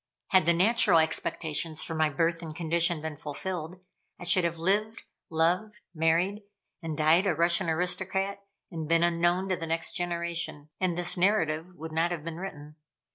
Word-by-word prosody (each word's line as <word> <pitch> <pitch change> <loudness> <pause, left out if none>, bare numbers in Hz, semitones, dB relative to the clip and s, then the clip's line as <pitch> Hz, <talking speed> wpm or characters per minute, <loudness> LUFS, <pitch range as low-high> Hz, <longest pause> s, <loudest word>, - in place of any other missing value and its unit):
Had 185 -4 +4
the 170 - +6
natural 205 +1 +4
expectations 160 0 0
for 165 - -4
my 155 -1 +2
birth 165 +3 0
and 160 -2 -7
condition 170 0 +1
been 160 -2 -5
fulfilled, 170 +3 -5 0.4
I - - -8
should 180 +1 +4
have 170 -1 -1
lived, 210 +6 0 0.3
loved, 180 +6 0
married 170 +5 +1 0.4
and 160 -3 -4
died 160 +5 +4
a 175 - +2
Russian 170 +2 +2
aristocrat, 190 +4 -1 0.3
and 160 -3 -5
been 165 0 +4
unknown 175 +2 +1
to 185 - +2
the 165 - -5
next 165 0 -1
generation 170 -3 -3
and 180 -2 0
this 175 +1 -1
narrative 175 -3 +1
would 160 -1 -8
not 165 +2 +1
have 170 -4 -4
been 165 0 -6
written. 150 -5 -8
170 Hz, 170 wpm, -28 LUFS, 160-185 Hz, 0.4 s, the